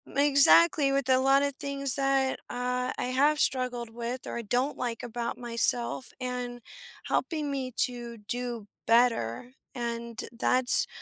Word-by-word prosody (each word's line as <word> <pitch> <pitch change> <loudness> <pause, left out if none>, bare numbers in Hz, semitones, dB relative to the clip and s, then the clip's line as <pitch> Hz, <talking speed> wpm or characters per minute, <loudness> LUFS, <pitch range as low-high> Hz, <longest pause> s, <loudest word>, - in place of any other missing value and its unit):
Exactly, 285 +1 +5
with 275 -1 0
a 260 - +5
lotta 275 +2 +3
things 275 -2 -2
that, 270 -1 +1
uh, 250 +1 -2
I - - -2
have 295 +3 +3
struggled 250 -4 -1
with 240 +2 -5
or - - -5
I - - -3
don't 245 +6 -1
like 240 -2 -4
about 235 0 -4
myself 240 +1 0
and 250 -1 -4 0.5
helping 305 -4 -1
me 265 -2 -3 0.2
to 240 -1 -8
do 240 +1 -4 0.2
better, 230 - +2 0.2
and 235 -1 -4
that's 245 +2 +3
250 Hz, 135 wpm, -28 LUFS, 235-275 Hz, 0.5 s, Exactly